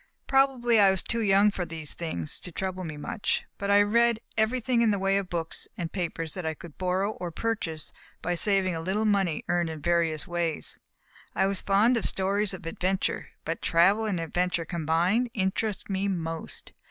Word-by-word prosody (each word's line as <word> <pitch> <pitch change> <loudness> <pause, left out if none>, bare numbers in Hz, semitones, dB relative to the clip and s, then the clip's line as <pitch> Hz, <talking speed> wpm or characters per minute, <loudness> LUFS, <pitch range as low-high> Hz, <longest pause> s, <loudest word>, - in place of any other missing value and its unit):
Probably 260 -4 +3
I 200 -1 +7
was 190 -1 +2
too 235 - -1
young 200 0 +5
for 190 - -3
these 160 -3 -5
things 125 - -3
to 180 - -8
trouble 185 +1 -3
me 155 -3 -6
much; 150 +7 -1 0.2
but 200 - -2
I 205 0 +6
read 235 +2 +3 0.2
everything 235 +2 +1
in 230 - +4
the 205 - +2
way 195 0 +1
of 195 -2 -3
books 165 -2 -3
and 170 -1 -3
papers 165 -3 -3
that 185 - -5
I 160 0 -2
could 165 0 -12
borrow, 185 +2 0
or 180 -4 -5
purchase 170 -5 -3 0.3
by 175 - -1
saving 190 0 +2
a 165 - -3
little 195 +6 0
money 195 -6 +1
earned 175 -1 +1
in 160 -1 -6
various 165 -1 +1
ways. 170 -2 -2 0.6
I - - +3
was 195 0 0
fond 215 +5 +3
of - - -1
stories 200 +1 +1
of 190 -2 -8
adventure; 185 +3 -1 0.2
but 165 +1 -3
travel 195 +6 +4
and 200 -5 -1
adventure 175 +1 -1
combined, 170 +8 +1
interested 200 +1 -1
me 195 0 -1
most. 165 -4 -4
190 Hz, 190 wpm, -27 LUFS, 170-205 Hz, 0.6 s, I